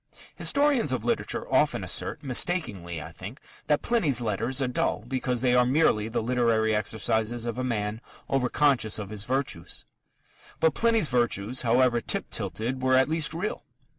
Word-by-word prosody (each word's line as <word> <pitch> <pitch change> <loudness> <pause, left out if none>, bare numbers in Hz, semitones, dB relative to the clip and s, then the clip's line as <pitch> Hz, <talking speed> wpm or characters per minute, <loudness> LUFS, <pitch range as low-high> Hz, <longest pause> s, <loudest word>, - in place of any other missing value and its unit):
Historians 280 - +2
of 120 -3 -2
literature 120 - -1
often - - +2
assert - - -1
mistakenly, 120 - -1
I 80 - -8
think 100 - -9 0.3
that 150 -1 +1
Pliny's 170 - +2
letters 120 +3 -1
are 135 - +1
dull, 125 -3 -1
because 125 -2 -1
they 125 -1 +2
are 125 0 +5
merely 125 -5 +2
the 115 - -2
literary 115 -2 +2
exercises 110 +2 -1
of 120 +1 -3
a - - -1
man 110 -3 -2 0.3
over 130 -2 0
conscious 135 -8 +2
of 105 -1 -6
his 105 0 -4
virtues. 130 -10 -3 0.7
But 160 -2 +3
Pliny's 225 -4 +2
virtues, 120 -1 0
however 120 0 +3
tip - - -1
tilted, 125 +4 -3
were 130 0 +3
at 130 +2 +4
least 160 -1 +1
real. 185 +6 -3
125 Hz, 165 wpm, -27 LUFS, 110-135 Hz, 0.7 s, are